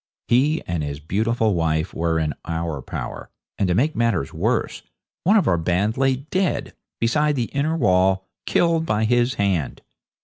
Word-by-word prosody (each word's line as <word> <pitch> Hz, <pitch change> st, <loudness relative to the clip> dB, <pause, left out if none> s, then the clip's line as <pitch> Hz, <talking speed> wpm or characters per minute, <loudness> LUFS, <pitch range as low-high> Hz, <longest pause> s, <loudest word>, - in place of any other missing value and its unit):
He 140 Hz, +6 st, +2 dB
and 85 Hz, -2 st, -2 dB
his 70 Hz, -1 st, -4 dB
beautiful 110 Hz, +7 st, 0 dB
wife 80 Hz, 0 st, 0 dB
were 85 Hz, 0 st, 0 dB
in 80 Hz, -2 st, 0 dB
our 80 Hz, -3 st, -3 dB
power, -, -, -6 dB, 0.3 s
and, 100 Hz, -, +2 dB
to 90 Hz, -, +1 dB
make 145 Hz, +9 st, +1 dB
matters 110 Hz, -11 st, 0 dB
worse, -, -, -1 dB, 0.4 s
one 205 Hz, +5 st, +5 dB
of 200 Hz, -, +2 dB
our 85 Hz, -2 st, +3 dB
band 90 Hz, +6 st, 0 dB
lay 135 Hz, 0 st, +2 dB
dead, 145 Hz, 0 st, -2 dB, 0.3 s
beside 150 Hz, +6 st, +2 dB
the 120 Hz, -4 st, -2 dB
inner 155 Hz, +4 st, 0 dB
wall, 95 Hz, -, +2 dB, 0.2 s
killed 165 Hz, -1 st, +2 dB
by 105 Hz, +1 st, +1 dB
his 120 Hz, +2 st, +2 dB
hand. 95 Hz, -7 st, -1 dB
105 Hz, 165 wpm, -22 LUFS, 85-135 Hz, 0.4 s, one